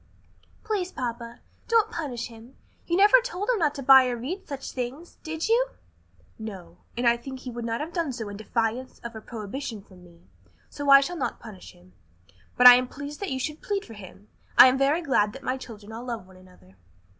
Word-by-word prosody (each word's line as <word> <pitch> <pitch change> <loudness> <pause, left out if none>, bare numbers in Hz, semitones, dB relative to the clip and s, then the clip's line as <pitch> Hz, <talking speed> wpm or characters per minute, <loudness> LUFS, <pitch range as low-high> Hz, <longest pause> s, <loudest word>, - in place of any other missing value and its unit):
"Please, 390 -4 -2
papa, 235 -1 -6 0.3
don't 450 -1 +3
punish 275 - -4
him. 230 +2 -13 0.3
You 345 - +1
never 415 +5 +7
told 410 -3 -5
him 465 - 0
not 300 -4 +1
to 275 - -6
buy 265 -1 +8
or 245 -1 -2
read 315 +12 -6
such 280 -3 -6
things, 260 +7 -6
did 320 +3 -4
you?" 475 +3 +3 0.7
"No; 185 -6 -9 0.2
and 240 0 +1
I 235 0 +4
think 260 +2 -9
he 255 - -7
would 235 0 -6
not 230 +3 -2
have 325 +3 -6
done 330 -5 -1
so 230 -3 -6
in 205 - -7
defiance 230 +4 -2
of 235 -1 -7
a 220 - -7
prohibition 220 0 -7
from 185 -3 -18
me. 170 -1 -19 0.5
So 285 -1 -4
I 275 0 +9
shall 350 +5 -4
not 270 - -3
punish 210 -5 -12
him. 90 +1 -22 0.6
But 250 - +4
I 245 0 +12
am 255 0 -1
pleased 285 +3 -8
that 400 - -4
you 265 - -2
should 300 +4 -4
plead 405 -1 -3
for 225 - -12
him. 205 0 -13 0.3
I - - +11
am 255 - 0
very 290 +5 +2
glad 210 -9 +1
that 270 +1 -11
my 255 -1 -1
children 220 -5 -11
all 230 +2 -8
love 235 -6 -5
one 185 0 -18
another." 180 - -20
250 Hz, 215 wpm, -26 LUFS, 225-300 Hz, 0.7 s, I